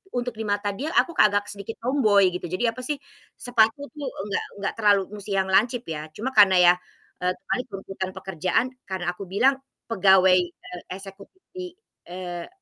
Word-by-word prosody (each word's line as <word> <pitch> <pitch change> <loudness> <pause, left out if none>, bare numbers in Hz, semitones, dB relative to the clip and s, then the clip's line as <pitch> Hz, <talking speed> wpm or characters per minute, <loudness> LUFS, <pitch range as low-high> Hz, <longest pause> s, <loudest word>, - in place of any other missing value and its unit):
untuk 245 0 -1
di 220 - -3
mata 205 0 0
dia 265 +10 -5
aku 340 - +4
agak 205 -1 +5
sedikit 200 +2 -7
tomboy 215 -8 +4
gitu. 180 - -5
Jadi 185 +6 -3
apa 255 - -11
sih, 290 +4 -2 0.4
sepatu 235 +1 +2
tuh 290 -3 -6 0.2
nggak 200 - -1 0.2
nggak - - -1
terlalu 205 -2 +5 0.2
musti 200 0 -4
yang 190 0 0
lancip 235 +5 +3
ya, 155 0 -5
cuma 255 +5 -3
karena 200 -5 +6
ya, 180 -1 +7 0.5
eee, 180 0 +1
terkait 245 +7 -3
tuntutan 195 -2 -5
pekerjaan 185 +3 0 0.2
karena 185 -2 -2
aku 185 +2 -9
bilang 265 +9 +2 0.3
pegawai, 190 -3 +5
eee, 175 0 -7
eksekutif 195 - -12
di, 365 -1 -7 0.3
eee, 175 -1 -6
200 Hz, 170 wpm, -25 LUFS, 185-240 Hz, 0.5 s, ya